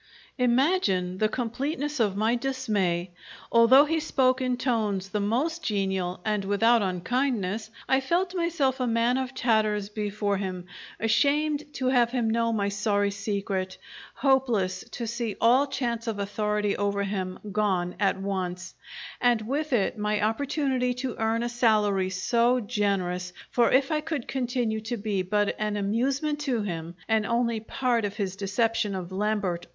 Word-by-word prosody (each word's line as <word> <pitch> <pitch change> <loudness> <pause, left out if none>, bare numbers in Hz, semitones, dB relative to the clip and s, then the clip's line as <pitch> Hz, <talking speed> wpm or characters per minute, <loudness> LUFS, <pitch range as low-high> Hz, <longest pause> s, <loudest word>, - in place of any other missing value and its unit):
Imagine 240 - +2
the 215 - +2
completeness 275 +5 -3
of 205 -4 +2
my 220 +3 +2
dismay! 215 -9 -1 0.4
Although 240 +5 +7
he 320 +2 0
spoke 260 -4 +2
in 250 -1 0
tones 215 -7 -1
the 210 - -1
most 265 +12 0
genial, 190 -5 -1
and 210 -2 0
without 225 +4 +3
unkindness, 215 +2 -1 0.2
I 265 - +3
felt 355 +7 0
myself 330 -7 0
a 250 - 0
man 235 +2 +2
of 260 0 -4
tatters 215 -5 +1
before 210 -1 -2
him, 185 -2 -4 0.3
ashamed 290 +6 +1
to 260 - -3
have 245 -2 +3
him 235 -3 0
know 230 0 +1
my 205 -3 0
sorry 205 0 0
secret, 200 -2 -3 0.4
hopeless 245 -9 +1
to 235 - -5
see 230 -1 -3
all 255 +5 +4
chance 235 -4 -3
of 220 -2 -2
authority 210 0 -1
over 200 0 0
him 190 -2 -3
gone 190 -4 0
at 195 -2 +2
once, 185 -2 -3 0.5
and 240 -2 +3
with 285 +7 -2
it 220 -2 +1
my 210 0 0
opportunity 260 +1 0
to 255 -1 -4
earn 225 +1 +1
a - - 0
salary 210 -5 +2
so 235 +6 +2
generous, 195 -5 -1 0.2
for 240 -1 +3
if 270 +2 +3
I 305 -1 +1
could 305 -5 -4
continue 245 -4 -1
to 235 +2 -4
be 205 -2 -1
but 205 +3 0
an 210 -1 -1
amusement 270 +9 0
to 260 -7 -1
him 170 -3 -5
and 220 -1 +2
only 235 -1 +1
part 240 +1 0
of 205 0 -3
his 195 -3 -3
deception 205 +1 0
of 185 -1 -5
Lambert 195 -3 -1
R. - - -32
220 Hz, 155 wpm, -27 LUFS, 200-255 Hz, 0.5 s, Although